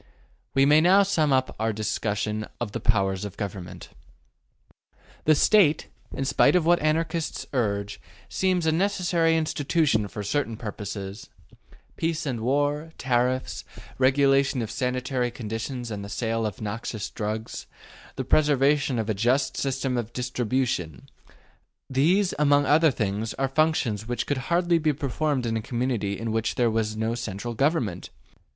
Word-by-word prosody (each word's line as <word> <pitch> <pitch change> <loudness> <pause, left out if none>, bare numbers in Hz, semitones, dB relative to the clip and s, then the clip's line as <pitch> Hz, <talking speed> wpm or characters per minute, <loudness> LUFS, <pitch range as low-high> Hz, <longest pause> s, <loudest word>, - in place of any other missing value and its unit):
We 135 0 +5
may 150 +2 +6
now 190 +4 +6
sum 160 -7 +1
up 130 -1 +1
our 110 0 +1
discussion 105 0 -2
of 120 -4 -3
the - - -4
powers 95 -3 +1
of 105 -2 -7
Government. 95 -4 -6 1.4
The 155 - +5
State, 160 -2 +4 0.2
in 135 - -3
spite 140 +5 +4
of 175 -3 +3
what 175 +1 +4
Anarchists 160 +1 -1
urge, 105 -4 -1 0.3
seems 185 -3 0
a 160 - +3
necessary 175 -2 +1
institution 150 -7 +1
for 105 +1 -6
certain 115 +1 -1
purposes. 100 -2 -6 0.7
Peace 165 0 -1
and 130 -5 -2
war, 145 +6 0
tariffs, 125 0 0 0.4
regulation 135 -1 +3
of 110 - -5
sanitary 125 0 -1
conditions 120 +1 -5
and 100 -1 -5
of 100 - -8
the - - -5
sale 115 -1 0
of 105 - -8
noxious 110 0 -4
drugs, 110 0 -4 0.5
the - - -3
preservation 145 -2 +3
of 110 -2 -1
a 110 - +1
just 125 +7 +1
system 135 -1 -1
of 120 -1 -4
distribution: 125 - -2 0.8
these, 175 +9 +2
among 145 -1 +4
others, 115 -8 +2
are 135 - 0
functions 135 -8 0
which 120 -1 -2
could 145 - -1
hardly 170 0 +3
be 155 -1 +1
performed 140 0 -1
in 115 -1 -1
a 110 - -1
community 115 -5 -2
in 115 0 -3
which 110 0 -1
there 120 -2 +2
was 110 -1 -1
no 110 +1 -1
central 120 0 -4
government. 120 - 0
125 Hz, 145 wpm, -25 LUFS, 110-150 Hz, 1.4 s, may